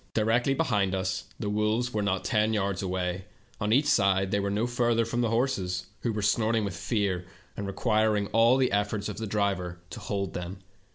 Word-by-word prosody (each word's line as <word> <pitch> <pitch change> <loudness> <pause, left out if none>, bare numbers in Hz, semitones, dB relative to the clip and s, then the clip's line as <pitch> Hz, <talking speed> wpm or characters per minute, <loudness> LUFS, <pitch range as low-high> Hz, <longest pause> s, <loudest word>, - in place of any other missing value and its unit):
Directly 115 +5 +2
behind 100 -6 +1
us 95 -1 -2
the 105 - -3
wolves 110 +4 0
were 105 - 0
not 95 -2 0
ten 110 0 +2
yards 100 -2 0
away; 90 -1 -2 0.3
on 105 +1 -1
each 135 +6 +4
side 95 -8 +3
they 100 - +2
were 100 0 -1
no 105 +3 0
further 120 -1 +1
from 120 +2 -1
the 115 - +1
horses, 95 -7 0
who 120 - -1
were 105 -1 -3
snorting 110 +1 +2
with 100 -3 -4
fear, 95 -6 -1 0.3
and 100 - -4
requir 110 +1 +2
ing 100 - 0
all 115 +3 +5
the 130 -1 +2
efforts 105 0 0
of 105 - -6
the 110 0 -4
driver 100 -4 -1
to - - -6
hold 100 -2 -3
them. 90 +2 -5
105 Hz, 205 wpm, -28 LUFS, 95-115 Hz, 0.3 s, all